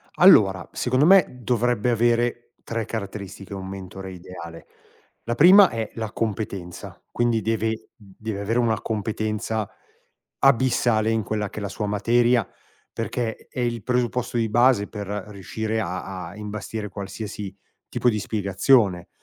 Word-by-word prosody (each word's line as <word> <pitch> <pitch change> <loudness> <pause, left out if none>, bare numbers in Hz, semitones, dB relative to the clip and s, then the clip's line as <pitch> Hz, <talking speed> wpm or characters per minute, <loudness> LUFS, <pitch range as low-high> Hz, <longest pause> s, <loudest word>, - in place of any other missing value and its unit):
Allora, 95 - +6
secondo 130 +3 +1
me, 190 0 +7 0.2
dovrebbe 120 0 +1
avere 120 +1 +1
3 115 -2 -3
caratteristiche 100 -3 -6
un 95 -1 -6
mentore 95 0 -8
ideale. 85 -2 -10 0.6
La 120 - -2
prima 185 +7 +8
è 115 -1 -4
la 110 -2 -4
competenza, 100 -6 -4
quindi 120 -2 +1
deve 110 0 -2
deve 105 0 -7
avere 115 +4 0
una 115 -4 +1
competenza 110 0 -2 0.7
abissale 115 -3 +3
in 115 -1 +1
quella 105 -2 -2
che - - -8
è - - -4
la 100 - -3
sua 105 +1 -4
materia, 115 +3 +2 0.4
perché 115 0 -4
è - - -10
il 120 -2 -1
presupposto 125 0 -1
di 115 -1 +1
base 120 -2 +4
per 105 -2 -6 0.2
riuscire 110 +2 -3
a 90 -2 -5
a 90 - -11
imbastire 105 0 -5
qualsiasi 100 0 -6 0.3
tipo 125 - +1
di 110 -3 +2
spiegazione. 100 -1 +2
110 Hz, 135 wpm, -24 LUFS, 100-120 Hz, 0.7 s, prima